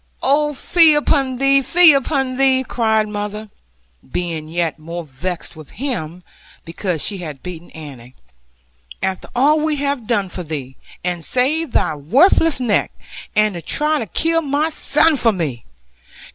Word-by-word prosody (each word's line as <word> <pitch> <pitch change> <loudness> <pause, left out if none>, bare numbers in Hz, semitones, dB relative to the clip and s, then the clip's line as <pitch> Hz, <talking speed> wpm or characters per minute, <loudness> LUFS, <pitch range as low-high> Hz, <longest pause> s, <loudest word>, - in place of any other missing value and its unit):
'Oh, 295 +3 +2
fie 315 +2 +4
upon 275 -3 +1
thee, 275 +1 +3
fie 345 +3 +6
upon 270 -2 -1
thee!' 265 -1 +3
cried 220 -2 +1
mother 210 0 -5 0.6
(being 165 -3 -3
yet 165 -1 -2
more 170 +2 -6
vexed 165 +6 -6
with 155 -2 -12
him, 180 - -4 0.4
because 165 -1 -3
she 200 -2 -4
had 150 -6 -8
beaten 175 -2 -8
Annie); 130 -5 -11 0.9
'after 190 -1 -3
all 290 +5 +4
we 310 0 0
have 280 -5 -2
done 210 -5 0
for 185 - -6
thee, 145 -6 -6 0.3
and 175 -2 -2
saved 265 - 0
thy - - +1
worthless 275 - +3
neck 235 -5 0 0.4
and 215 -1 +3
to 170 - -6
try 300 - 0
to 225 - -4
kill 330 - 0
my 295 +1 0
son 310 0 +3
for 230 -3 +3
me! 150 - -4
220 Hz, 150 wpm, -19 LUFS, 170-280 Hz, 0.9 s, fie